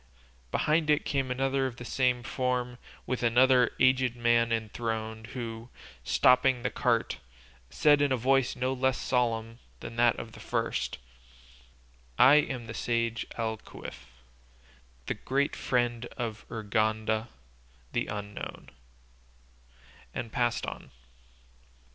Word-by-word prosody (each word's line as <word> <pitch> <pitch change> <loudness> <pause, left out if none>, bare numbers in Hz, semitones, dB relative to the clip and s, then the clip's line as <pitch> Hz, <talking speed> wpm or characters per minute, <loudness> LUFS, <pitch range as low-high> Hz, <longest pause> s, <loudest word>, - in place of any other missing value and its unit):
Behind 155 - +1
it 150 +1 +3
came 135 -3 -1
another 135 +1 +1
of 125 - -7
the 120 - -9
same 125 0 +1
form, 125 0 -2 0.3
with 130 0 -2
another 125 +1 +4
aged 130 -1 +3
man 120 -1 +2
enthroned, 110 0 -3
who, 115 -1 -6 0.3
stopping 125 0 +4
the 125 - 0
cart, 120 -3 0 0.5
said 145 - +4
in 145 -1 +2
a 130 - +2
voice 130 +1 +2
no 130 +1 -1
less 130 0 +1
solemn 115 -2 -1 0.2
than 115 - -8
that 120 0 +4
of 115 - -7
the - - -13
first, - - -2 1.2
"I 140 +4 +8
am 130 -5 0
the 110 - -7
sage 115 -1 -1
Alquife, 110 - -6 1.0
the - - -1
great 140 +2 -1
friend 120 -2 0
of 115 -3 -5
Urganda 110 +1 0 0.6
the - - -1
Unknown," 105 0 -7 1.4
and 115 - -4
passed 120 -2 0
on. - - -7
120 Hz, 120 wpm, -29 LUFS, 115-130 Hz, 1.4 s, I